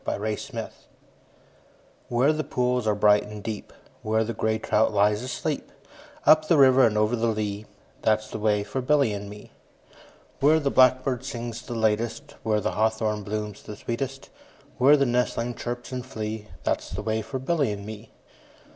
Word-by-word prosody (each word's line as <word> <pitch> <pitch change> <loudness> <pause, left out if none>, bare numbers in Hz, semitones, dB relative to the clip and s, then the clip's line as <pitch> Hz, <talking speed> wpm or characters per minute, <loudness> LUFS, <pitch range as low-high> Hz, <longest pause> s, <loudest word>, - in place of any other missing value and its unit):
A - - -2
Boy's 105 +1 -3
Song - - -6 1.4
WHERE 130 +6 +3
the 155 0 -2
pools 125 -3 0
are 105 - +2
bright 105 0 +5
and 105 -1 -9
deep, 110 -1 -5 0.3
Where 110 +1 +1
the 115 +1 -3
grey 110 0 0
trout 110 0 +1
lies 105 +1 +2
asleep, 130 +1 -4 0.5
Up 155 0 +6
the 165 - +4
river 130 -2 +7
and 105 -1 -1
over 105 +3 +2
the 115 0 0
lea, 105 -1 -2 0.3
That 110 -1 +2
's 110 - -14
the - - -5
way 105 -1 +1
for 130 +5 -3
Billy 140 -4 +2
and 100 0 -6
me. 105 0 -12 0.9
Where 155 +3 +5
the 140 -2 0
blackbird 130 0 +3
sings 120 -3 -5
the 120 - -7
latest, 110 0 -1
5 - - -19
Where 110 -2 +1
the - - -1
hawthorn 110 -1 0
blooms 105 0 -5
the 105 - -8
sweetest, 135 +5 -5 0.5
Where 140 +4 +7
the 140 - +2
nestlings 120 -1 -1
chirp 120 +2 -5
and 125 -1 -4
flee, 110 -3 -5 0.2
That - - 0
's - - -11
the 95 +4 -5
way 110 0 -1
for 120 +5 -5
Billy 135 -2 0
and 100 -1 -6
me. 110 +1 -9
110 Hz, 185 wpm, -25 LUFS, 105-130 Hz, 1.4 s, river